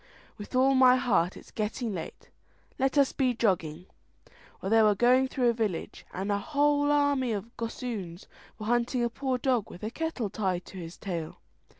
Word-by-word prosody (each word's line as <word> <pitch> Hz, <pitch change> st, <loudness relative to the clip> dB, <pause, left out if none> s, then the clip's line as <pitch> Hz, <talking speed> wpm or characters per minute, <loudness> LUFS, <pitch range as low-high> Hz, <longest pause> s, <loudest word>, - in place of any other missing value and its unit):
"With 205 Hz, +4 st, -8 dB
all 265 Hz, +1 st, +4 dB
my 255 Hz, -1 st, +6 dB
heart, 200 Hz, -9 st, +1 dB
it's -, -, -14 dB
getting 220 Hz, +1 st, -3 dB
late, 165 Hz, -3 st, -8 dB, 0.5 s
let 270 Hz, +2 st, +1 dB
us 280 Hz, -2 st, +4 dB
be 255 Hz, -3 st, +1 dB
jogging." 175 Hz, -7 st, 0 dB, 0.7 s
Well, 195 Hz, -, -4 dB
they 225 Hz, 0 st, +6 dB
were 210 Hz, -1 st, +4 dB
going 250 Hz, +5 st, +4 dB
through 255 Hz, -2 st, +1 dB
a -, -, +2 dB
village, 215 Hz, -7 st, -3 dB
and 195 Hz, +3 st, -3 dB
a 200 Hz, -, +1 dB
whole 290 Hz, +2 st, +2 dB
army 285 Hz, -4 st, +2 dB
of 215 Hz, +3 st, -6 dB
gossoons 220 Hz, -6 st, -5 dB, 0.3 s
were 215 Hz, -, -7 dB
hunting 240 Hz, +2 st, +1 dB
a 235 Hz, -, 0 dB
poor 260 Hz, 0 st, -1 dB
dog 250 Hz, -4 st, 0 dB
with 180 Hz, -, -12 dB
a 215 Hz, -, -3 dB
kettle 270 Hz, -9 st, -3 dB
tied 185 Hz, -4 st, -2 dB
to 190 Hz, -, -10 dB
his 170 Hz, 0 st, -8 dB
tail. 170 Hz, -5 st, -5 dB
235 Hz, 185 wpm, -28 LUFS, 195-260 Hz, 0.7 s, my